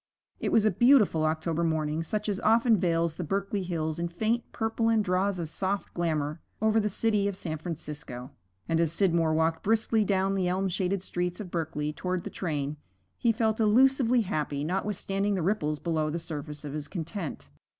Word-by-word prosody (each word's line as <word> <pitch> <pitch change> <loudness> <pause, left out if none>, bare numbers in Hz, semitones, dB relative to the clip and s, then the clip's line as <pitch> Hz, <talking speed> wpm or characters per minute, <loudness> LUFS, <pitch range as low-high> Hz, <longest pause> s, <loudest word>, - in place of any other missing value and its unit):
It - - -1
was 220 -2 +4
a 215 - +4
beautiful 210 - +4
October 160 +1 -1
morning 155 -1 0
such 210 +6 -3
as 200 -2 -1
often 225 +1 +4
veils 165 -2 +1
the 180 - -3
Berkeley 195 +4 -1
hills 160 -3 -2
in 170 - 0
faint 220 +7 -1
purple 225 0 0
and 220 -2 +3
draws 185 +1 +1
a 170 - -2
soft 190 +5 -3
glamour 155 -2 -1 0.2
over 220 +1 +3
the 210 -1 +1
city 210 0 +1
of 200 -2 -3
San 160 -4 -4
Francisco; 150 -6 -6 0.4
and 165 0 +1
as 165 -2 +2
Scidmore 165 -3 +2
walked 160 0 +1
briskly 220 0 +2
down 195 -1 +1
the 190 -2 0
elm 190 +2 0
shaded 185 +1 -1
streets 180 -1 -2
of 190 -5 -7
Berkeley 150 -3 -2
toward 180 +2 -2
the - - -6
train, 150 -4 -3 0.4
he 235 - +3
felt 220 -1 0
elusively 250 +2 +4
happy, 150 -8 -2
notwithstanding 195 +3 -1
the 180 - -1
ripples 155 -6 0
below 155 -1 -1
the 160 - -2
surface 150 -2 -6
of 145 - -5
his 150 -1 -4
content. 165 - -5
180 Hz, 185 wpm, -28 LUFS, 160-210 Hz, 0.4 s, was